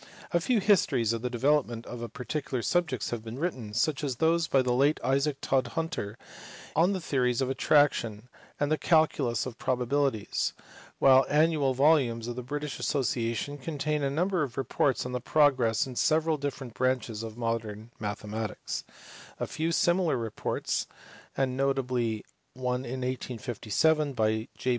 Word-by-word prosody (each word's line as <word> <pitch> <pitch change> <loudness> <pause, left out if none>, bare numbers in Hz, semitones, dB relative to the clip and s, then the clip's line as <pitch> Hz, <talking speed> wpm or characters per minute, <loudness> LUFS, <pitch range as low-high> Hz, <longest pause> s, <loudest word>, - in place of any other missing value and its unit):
A 170 - +3
few 240 +5 +2
histories 150 - +3
of 115 - -3
the 125 - -2
development 125 -2 +1
of 120 -1 -6
particular 135 -2 -3
subjects 160 - 0
have 115 -2 -3
been 115 +2 -7
written 130 -9 -3
such 135 +7 0
as 135 -3 -1
those 165 +4 +2
by 135 -3 +3
the 125 -1 +1
late 140 +5 +3
Isaac 135 +2 +1
Todhunter 130 - -1 0.6
on 175 +5 +4
the 190 - -2
theories 125 -7 0
of 130 -1 0
attraction 125 -6 +2 0.3
and 145 - +2
on - - -3
the 155 - +1
calculus 150 -8 +2
of 125 -2 -7
probabilities 130 -2 0 0.4
while 135 -1 +6
the - - -9
annual 150 -3 +3
volumes 130 -5 +3
of 120 - -4
the 125 - -4
British 145 +3 -4
Asso 140 -2 0
ciation 120 +4 -2
contain 150 +1 -2
a 140 - +1
number 180 +5 0
of 135 -5 -3
reports 135 0 0
on 125 - -4
the 125 -1 -3
progress 130 -5 +3
in 130 -2 -8
several 160 +3 +2
different 140 -4 -5
branches 125 -4 -1
of 115 0 -7
modern 115 -1 -3
mathematics; 105 +1 -4 0.6
a - - -1
few 160 +1 -2
similar 175 -3 +2
reports 115 -3 -2 0.5
(and 130 -1 +1
notably 125 -5 0 0.3
one 125 0 -2
in 130 +2 -4
1857 130 +4 0
by 110 -1 0
J. 130 - -2
130 Hz, 160 wpm, -28 LUFS, 120-150 Hz, 0.6 s, while